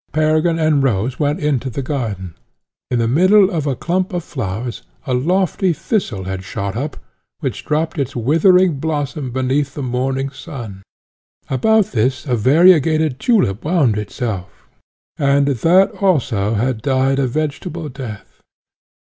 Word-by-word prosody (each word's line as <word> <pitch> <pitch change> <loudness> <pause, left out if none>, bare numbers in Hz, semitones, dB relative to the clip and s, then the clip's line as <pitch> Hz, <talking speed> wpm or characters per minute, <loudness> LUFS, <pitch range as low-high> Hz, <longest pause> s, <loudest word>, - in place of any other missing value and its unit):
Peregrine 155 +2 +2
and 155 -3 +2
Rose 125 -1 0
went 150 +3 0
into 140 -5 -1
the 135 +3 -4
garden. 110 - -4 0.6
In 125 - 0
the 115 -1 +1
middle 185 - +4
of 155 -4 -2
a 135 - 0
clump 180 +8 -1
of 175 -1 -2
flowers 115 -3 -5 0.2
a 130 - -1
lofty 180 +6 +1
thistle 140 - -2
had 95 0 -5
shot 100 0 -4
up, 140 +5 -4 0.4
which - - -3
drooped 155 +1 -1
its 135 -1 -2
withering 165 - +3
blossom 145 -3 -3
beneath 130 +2 -1
the 145 - -4
morning 130 +2 -1
sun; 125 - -8 0.7
about 215 - +2
this 125 +3 0
a 125 -4 0
variegated 155 - +4
tulip 155 - +1
wound 150 - +2
itself, 105 -2 -5 0.5
and 140 -1 +3
that 165 - +3
also 115 - +1
had 120 +1 -1
died 135 +1 +1
a 135 - +1
vegetable 155 +4 -3
death. 125 -6 -9
140 Hz, 140 wpm, -18 LUFS, 120-160 Hz, 0.7 s, middle